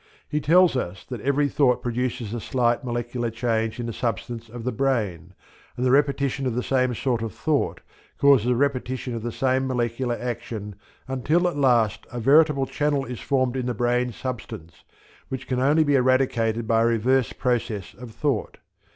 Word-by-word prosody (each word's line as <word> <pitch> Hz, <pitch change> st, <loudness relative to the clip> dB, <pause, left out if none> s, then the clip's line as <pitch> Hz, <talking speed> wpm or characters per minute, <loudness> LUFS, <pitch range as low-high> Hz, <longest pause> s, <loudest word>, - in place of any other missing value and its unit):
He 150 Hz, -, -1 dB
tells 175 Hz, +2 st, +5 dB
us 95 Hz, -7 st, -4 dB
that 125 Hz, -4 st, -5 dB
every 140 Hz, +3 st, +2 dB
thought 135 Hz, -3 st, +2 dB
produces 120 Hz, -2 st, -2 dB
a 120 Hz, -, -3 dB
slight 120 Hz, +2 st, 0 dB
molecular 120 Hz, -1 st, -2 dB
change 115 Hz, 0 st, -1 dB
in 120 Hz, -, -3 dB
the 115 Hz, -, -4 dB
substance 115 Hz, 0 st, -4 dB
of 120 Hz, +1 st, -8 dB
the 125 Hz, -, -1 dB
brain, 105 Hz, -, -1 dB, 0.4 s
and 125 Hz, -, -1 dB
the 125 Hz, -, +3 dB
repetition 140 Hz, -1 st, +1 dB
of 120 Hz, -, -2 dB
the 125 Hz, -, -1 dB
same 130 Hz, -2 st, +1 dB
sort 120 Hz, -1 st, -1 dB
of 115 Hz, -4 st, -5 dB
thought -, -, -1 dB, 0.4 s
causes 140 Hz, -5 st, +5 dB
a 125 Hz, -, +3 dB
repetition 130 Hz, -1 st, -1 dB
of 115 Hz, -, -4 dB
the 120 Hz, +1 st, -3 dB
same 130 Hz, +2 st, 0 dB
molecular 120 Hz, -1 st, -1 dB
action 110 Hz, -4 st, -5 dB, 0.3 s
until 150 Hz, +7 st, +1 dB
at 175 Hz, -, -2 dB
last 120 Hz, -7 st, +2 dB
a 120 Hz, -, -4 dB
veritable 140 Hz, +2 st, +4 dB
channel 145 Hz, -1 st, 0 dB
is 125 Hz, -3 st, -6 dB
formed 130 Hz, -2 st, 0 dB
in 130 Hz, -1 st, -2 dB
the 125 Hz, -, -2 dB
brain 120 Hz, +2 st, +1 dB
substance, 115 Hz, -9 st, -7 dB, 0.5 s
which 130 Hz, 0 st, -5 dB
can 125 Hz, -1 st, -1 dB
only 145 Hz, +5 st, +4 dB
be 145 Hz, -1 st, +1 dB
eradicated 125 Hz, -4 st, +2 dB
by 115 Hz, 0 st, +3 dB
a -, -, +3 dB
reverse 120 Hz, +2 st, +2 dB
process 115 Hz, -5 st, -2 dB
of 125 Hz, +1 st, -10 dB
thought. 115 Hz, +1 st, -2 dB
125 Hz, 180 wpm, -24 LUFS, 115-135 Hz, 0.5 s, tells